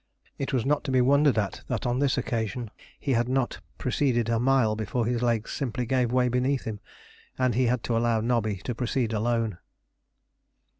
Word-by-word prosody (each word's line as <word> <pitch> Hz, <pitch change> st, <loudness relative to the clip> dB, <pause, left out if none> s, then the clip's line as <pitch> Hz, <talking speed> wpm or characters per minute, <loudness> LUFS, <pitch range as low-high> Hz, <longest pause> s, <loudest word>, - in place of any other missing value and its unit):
It 135 Hz, -, -2 dB
was 130 Hz, -4 st, 0 dB
not 145 Hz, +1 st, +1 dB
to 135 Hz, -, -2 dB
be 130 Hz, -, +3 dB
wondered 140 Hz, +1 st, +4 dB
at 100 Hz, -4 st, -1 dB
that -, -, -2 dB
on 120 Hz, +1 st, 0 dB
this 140 Hz, -2 st, +2 dB
occasion 115 Hz, -2 st, -2 dB, 0.3 s
he 140 Hz, -, 0 dB
had 120 Hz, +1 st, +1 dB
not 130 Hz, -1 st, -1 dB, 0.2 s
proceeded 125 Hz, -3 st, 0 dB
a 115 Hz, -1 st, +2 dB
mile 125 Hz, -3 st, +3 dB
before 110 Hz, +2 st, -1 dB
his 120 Hz, 0 st, 0 dB
legs 115 Hz, -2 st, 0 dB
simply 125 Hz, -3 st, -2 dB
gave 125 Hz, -1 st, +1 dB
way 125 Hz, 0 st, +3 dB
beneath 125 Hz, +2 st, 0 dB
him, 110 Hz, -2 st, -5 dB, 0.6 s
and 130 Hz, -2 st, +2 dB
he 125 Hz, +3 st, +2 dB
had 120 Hz, -1 st, 0 dB
to 115 Hz, -, -1 dB
allow 115 Hz, -1 st, +2 dB
Nobby 110 Hz, -2 st, 0 dB
to 125 Hz, -, -2 dB
proceed 120 Hz, -1 st, -1 dB
alone. 115 Hz, -3 st, 0 dB
120 Hz, 190 wpm, -27 LUFS, 115-130 Hz, 0.6 s, wondered